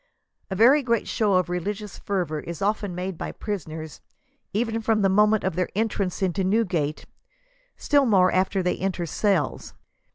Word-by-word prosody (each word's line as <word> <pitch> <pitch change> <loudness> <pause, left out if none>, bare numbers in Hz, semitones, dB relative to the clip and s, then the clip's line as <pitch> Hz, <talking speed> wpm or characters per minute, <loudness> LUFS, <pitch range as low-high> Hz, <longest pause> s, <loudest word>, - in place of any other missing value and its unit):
A 190 - -3
very 250 +9 +6
great 235 -4 0
show 210 -4 +1
of 185 0 +2
religious 200 +3 -4
fervor 175 -6 -2
is 170 +2 -7
often 205 -2 -1
made 180 -1 -4
by - - -4
prisoners, 160 -7 -6 0.5
even 225 +1 -1
from 220 -2 +1
the 195 - +4
moment 210 +2 +3
of 190 -3 -1
their 180 0 -1
en 220 +2 +1
trance 195 -2 -3
into 190 +1 0
Newgate, 185 -7 0 0.7
still 285 -3 +2
more 185 -4 +4
after 190 +1 +1
they 180 - 0
enter 185 -2 -2
the - - -4
cells. 185 -4 -1
195 Hz, 170 wpm, -24 LUFS, 180-215 Hz, 0.7 s, very